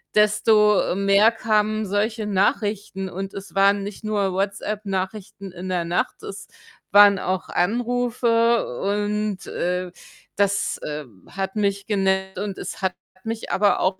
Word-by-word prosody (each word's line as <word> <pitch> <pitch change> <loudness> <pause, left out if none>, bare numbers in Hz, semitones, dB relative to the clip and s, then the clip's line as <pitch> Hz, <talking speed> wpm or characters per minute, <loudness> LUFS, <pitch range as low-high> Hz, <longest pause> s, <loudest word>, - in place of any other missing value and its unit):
desto, 210 0 +4
äh, - - 0
mehr 200 +3 +4
kamen 215 -1 0
solche 210 +2 -1
Nachrichten 200 -1 0
und 195 +2 -6
es 195 0 -9
waren 200 +1 +3
nicht 205 +2 -8
nur 205 -3 0
WhatsApp-Nachrichten 195 -1 -3
in 185 +1 -8
der 180 -2 0
Nacht. 175 +1 -2
Es - - -8 0.4
waren 205 -1 +7
auch 185 0 -2
Anrufe 235 +2 +1 0.2
und, 205 0 -1
äh, 180 0 -2 0.5
das, 200 0 +1
äh, 150 0 -5 0.3
hat 195 +1 -4
mich 200 -1 0
genervt 190 -2 0
und 200 -2 -4
es - - -7
hat 190 -1 0 0.3
mich 225 0 -4
aber 205 +1 +3
auch 185 0 +1
200 Hz, 135 wpm, -23 LUFS, 190-215 Hz, 0.5 s, waren